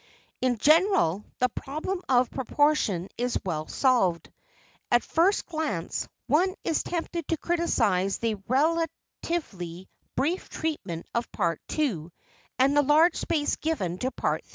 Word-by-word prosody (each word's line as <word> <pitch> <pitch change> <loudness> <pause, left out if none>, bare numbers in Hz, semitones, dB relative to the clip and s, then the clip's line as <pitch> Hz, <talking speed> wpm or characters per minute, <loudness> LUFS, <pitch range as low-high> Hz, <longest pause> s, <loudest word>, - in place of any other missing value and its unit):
In 250 -2 +2
general, 305 - +4
the 250 - +2
problem 310 +10 -4
of 250 -1 +3
proportion 265 - +1
is 245 0 0
well 155 -4 -2
solved. 215 -11 +2 0.6
At 240 -1 +4
first 360 +5 +2
glance, 310 - -3 0.2
one 355 +8 +2
is 320 - +1
tempted 340 -2 -3
to 330 - 0
criticize 225 - +1
the 220 -3 -2
relatively 275 - -2 0.3
brief 325 +8 -1
treatment 205 - -4
of 235 0 -2
Part 170 -6 -1 0.2
II 215 - 0 0.5
and 270 +2 +4
the 290 - +6
large 310 +4 +5
space 300 -3 0
given 190 - -2
to 255 - 0
Part - - -1
III. - - -30
265 Hz, 130 wpm, -27 LUFS, 195-320 Hz, 0.6 s, the